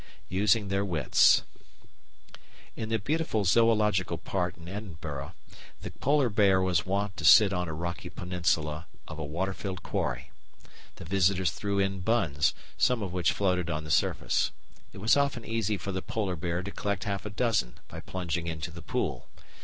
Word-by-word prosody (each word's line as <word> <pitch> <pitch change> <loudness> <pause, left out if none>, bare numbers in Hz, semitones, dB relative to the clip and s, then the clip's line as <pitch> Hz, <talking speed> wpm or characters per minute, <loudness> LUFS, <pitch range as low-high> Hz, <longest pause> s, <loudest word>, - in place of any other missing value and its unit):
Using 100 +2 +2
their 100 0 +1
Wits 85 -8 +4 1.3
In 110 - -5
the 115 - +2
beautiful 125 -2 -1
Zoological 105 -4 +3
Park 90 +1 -2
in 85 0 -12
Edinburgh 80 -8 -6 0.5
the - - -6
Polar 140 -2 +2
Bear 100 -3 +4
was 95 -3 +1
wont 100 +1 -1
to 80 - -6
sit 100 +5 +8
on 90 -1 -1
a 80 - -4
rocky 85 +2 -4
peninsula 85 -3 -1 0.2
of 80 0 -8
a - - -3
water 85 +7 -2
filled 95 -2 -6
quarry. - - -3 0.6
The - - -10
visitors 95 0 +2
threw 100 -1 -3
in 95 -1 0
buns, 90 -9 +1 0.2
some 125 -4 +3
of 90 -3 -5
which 90 -2 +2
floated 90 -4 0
on 75 -1 -2
the 75 - -5
surface. - - +1 0.4
It - - -13
was 105 +4 +3
often 140 -5 0
easy 110 -2 -1
for 100 +2 -5
the 95 0 -3
Polar 100 -4 -2
Bear 85 +2 -2
to 100 - -6
collect 100 -1 -2
half 100 -2 -3
a - - -4
dozen 105 - 0
by - - -9
plunging 85 -2 -3
into 80 0 -4
the 85 +1 -9
pool. - - -3
95 Hz, 170 wpm, -29 LUFS, 85-105 Hz, 1.3 s, sit